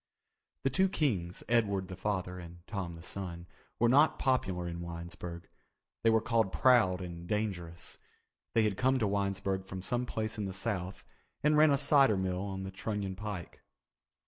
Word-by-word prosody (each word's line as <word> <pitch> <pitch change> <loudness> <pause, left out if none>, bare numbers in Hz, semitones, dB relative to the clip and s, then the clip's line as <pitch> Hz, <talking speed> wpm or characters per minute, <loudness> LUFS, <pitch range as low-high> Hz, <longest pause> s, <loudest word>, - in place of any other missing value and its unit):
The 135 - +2
two 190 +8 +3
Kings, 100 - 0
Edward 100 -5 +2
the 95 - -7
father, 95 -2 -2
and 85 0 -11
Tom 95 -5 -4
the 80 - -11
son, 90 -3 -4 0.3
were 120 - +4
not 140 +5 +5
popular 95 -10 0
in 85 0 -5
Winesburg. 85 0 -7 0.5
They 115 - +4
were 110 0 +5
called 115 -5 +2
proud 110 -8 +4
and 85 -1 -7
dangerous. 90 -5 -3 0.6
They 115 - +5
had 105 -3 0
come 130 +1 +3
to 115 - +1
Winesburg 100 -1 -1
from 95 -1 -6
some 125 +4 0
place 110 -1 -3
in 105 - -1
the 95 - -4
South 95 -2 -3 0.4
and 150 +1 +4
ran 155 +1 +7
a 140 - +4
cider 135 -7 +5
mill 95 -1 -1
on 95 -1 -4
the 95 - -5
Trunion 100 -1 -3
Pike. 100 -4 -6
100 Hz, 170 wpm, -32 LUFS, 90-115 Hz, 0.6 s, ran